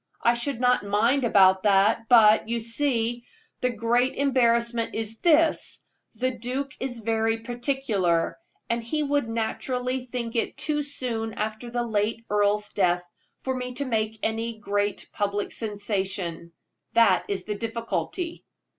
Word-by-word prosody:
I 235 - +5
should 240 +1 -3
not 250 0 +3
mind 230 +6 +2
about 190 -4 +5
that; 205 +3 +3
but, 220 -2 +6
you 235 0 0
see, 235 0 -1 0.4
the 250 - +1
great 240 +2 +1
embarrassment 235 -4 +1
is 225 0 -2
this 325 -1 +3 0.3
the 255 +3 0
duke 260 +4 -3
is 245 -3 -4
very 225 0 +1
particular, 230 - 0 0.3
and 235 0 -1
he 300 +6 -1
would 285 -4 0
naturally 250 +3 -2
think 235 -2 -4
it 230 - -1
too 295 -1 0
soon 240 -6 -3
after 220 +3 -4
the 240 0 -1
late 220 +1 -1
earl's 210 0 +1
death 180 -3 +2 0.4
for 260 0 -1
me 250 -1 -5
to 280 +2 -2
make 220 -3 -1
any 225 +1 -2
great 205 -1 -2
public 205 -1 -1
sensation 195 -5 -3 0.4
that 220 -6 +5
is 195 -2 -2
the 210 - -3
difficulty." 230 - -3
230 Hz, 140 wpm, -26 LUFS, 210-250 Hz, 0.4 s, but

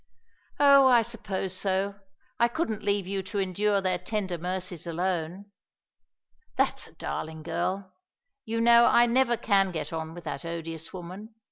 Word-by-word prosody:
"Oh, 280 -2 +7
I 240 -3 +6
suppose 205 -5 -4
so. 195 +1 0 0.5
I 235 - +5
couldn't 235 -5 -2
leave 200 -2 0
you 195 +1 -2
to 190 +3 -6
endure 200 +1 +1
their 185 -1 0
tender 185 -2 -3
mercies 180 -1 -4
alone." 180 +3 -3 1.0
"That's - - +1
a - - -20
darling 160 0 -5
girl! 185 +3 -3 0.5
You 230 -1 -2
know 235 0 +7
I 240 - +6
never 240 0 +2
can 195 -3 +2
get 165 -1 -5
on 160 0 -5
with 175 - -9
that 140 -3 -5
odious 165 -1 -6
woman. 190 +5 -9
190 Hz, 150 wpm, -27 LUFS, 175-220 Hz, 1.0 s, Oh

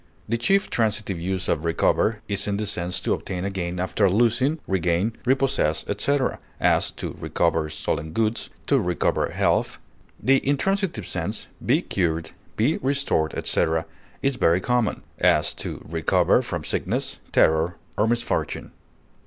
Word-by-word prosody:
The 115 - 0
chief 195 - +2
transitive 105 -5 0
use 95 +1 -2
of 75 - 0
recover 105 +6 +1
is 100 -1 0
in 100 -1 0
the 105 - -1
sense 90 -3 0
to - - +1
obtain 90 0 -3
again 90 -3 -3
after 95 +2 +2
losing, 120 - +2
regain, 90 +3 +1
repossess, 125 - +1
etc.; 130 +6 0 0.2
as, - - +3
to - - -5
recover 80 -2 0
stolen 75 +1 -3
goods; 110 +5 0 0.2
to - - +3
recover 90 0 0
health. - - +1 0.4
The 135 +1 +4
intransitive 160 - 0
sense, - - -3 0.2
be - - +2
cured, 80 -3 -1 0.3
be 130 +9 +2
restored, 135 - 0
etc., 80 0 0 0.4
is 135 -2 +1
very 85 -4 +3
common; 120 +2 0 0.2
as, - - +3
to - - -6
recover 80 0 +3
from - - -4
sickness, - - -2
terror, 80 +3 +3 0.2
or 105 - +2
misfortune. 120 +1 -1
100 Hz, 140 wpm, -24 LUFS, 85-120 Hz, 0.4 s, The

